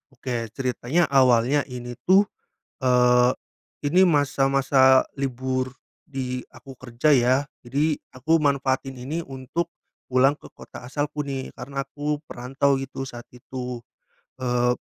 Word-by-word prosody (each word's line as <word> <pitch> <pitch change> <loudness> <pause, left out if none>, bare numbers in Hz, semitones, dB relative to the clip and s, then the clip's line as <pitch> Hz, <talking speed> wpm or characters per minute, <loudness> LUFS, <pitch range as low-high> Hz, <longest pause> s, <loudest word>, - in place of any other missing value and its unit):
Oke 120 -4 -4
ceritanya 130 +6 0
awalnya 130 +1 +4
ini 120 -1 -6
tuh, 195 +3 +5 0.6
eee, 125 -1 +5 0.6
ini 180 +6 +4
masa-masa 135 -4 +4
libur 130 -1 -2 0.3
di 130 -4 -4
aku 135 -2 -13
kerja 130 +4 +2
ya, 125 0 +4 0.3
jadi 145 +5 +1 0.2
aku 150 +6 +2
manfaatin 135 -1 0
ini 150 +7 -4
untuk 135 +5 -4 0.4
pulang 130 +3 +4
ke - - -15
kota - - -12
asalku 150 +2 -2
nih 135 -2 -5
karena 135 +2 -4
aku 145 +1 -3
perantau 135 +3 0
gitu 135 0 -5
saat 120 -1 -9
itu, 125 0 -6 0.6
eee, 125 -1 +2
130 Hz, 120 wpm, -24 LUFS, 125-145 Hz, 0.6 s, tuh